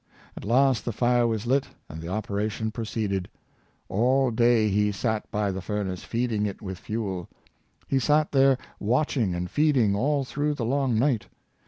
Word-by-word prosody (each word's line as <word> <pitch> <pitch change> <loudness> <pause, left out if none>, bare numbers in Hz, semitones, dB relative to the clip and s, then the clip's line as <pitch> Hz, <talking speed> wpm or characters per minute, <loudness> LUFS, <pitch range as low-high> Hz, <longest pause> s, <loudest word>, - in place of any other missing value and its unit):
At - - -8
last 125 0 +3
the 120 - -2
fire 120 +1 +2
was 110 -1 -2
lit, 130 +3 +2 0.2
and 80 +1 -8
the 80 - -7
operation 105 +2 -2
proceeded. 105 -4 -3 0.6
All 125 +6 +2
day 115 -1 +3
he 105 +1 +2
sat 110 +1 -2
by 105 -1 0
the 95 0 -4
furnace, 95 -2 -3
feeding 115 -3 -1
it 100 - -6
with 95 -3 -6
fuel. 100 -5 -4 0.6
He 135 - +2
sat 150 +4 +2
there 135 -1 +4 0.2
watching 120 - +1
and 90 0 -2
feeding 135 - +2
all 140 +5 +1
through 145 +3 -1
the 120 - -3
long 130 -1 +1
night. 125 -2 +1
115 Hz, 165 wpm, -26 LUFS, 100-130 Hz, 0.6 s, there